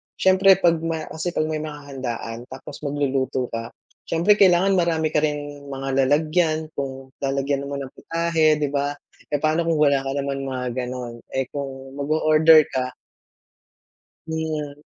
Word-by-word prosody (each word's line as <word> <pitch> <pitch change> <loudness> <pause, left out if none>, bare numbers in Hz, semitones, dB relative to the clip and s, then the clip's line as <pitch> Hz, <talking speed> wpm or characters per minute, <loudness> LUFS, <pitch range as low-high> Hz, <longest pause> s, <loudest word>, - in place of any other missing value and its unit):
siyempre, 190 0 +5
'pag 170 -2 +4
may 165 -1 -2
kasi 170 +2 -4
'pag - - +2
may 155 0 -2
mga 150 -2 -7
handaan 120 -2 -5
tapos 130 0 -9
magluluto 135 -3 -1
ka, 115 0 -4 0.4
siyempre, 185 +6 +3
kailangan 190 0 +5
marami 160 -2 +1
ka 150 - +3
rin 145 -1 -3
mga 135 -1 0
lalagyan 155 +1 +1
kung 135 -2 -6
lalagyan 140 0 -1
mo 140 - -4
ng 135 -2 -5
putahe, 165 -2 +1
'di 145 -2 -2
ba? 145 0 -1 0.3
Eh, 145 - 0
paano 160 +2 +2
kung 165 - +2
wala 140 -2 +4
ka 135 - -2
naman 140 -1 -2
mga 130 -1 -3 0.2
gano'n, 125 -2 -5 0.2
eh, 135 -1 +1
kung 135 -1 -6
mag-o-order 155 +1 +5
ka 130 -1 -2 1.3
Hmm, 155 -2 -3
145 Hz, 155 wpm, -23 LUFS, 135-160 Hz, 1.3 s, siyempre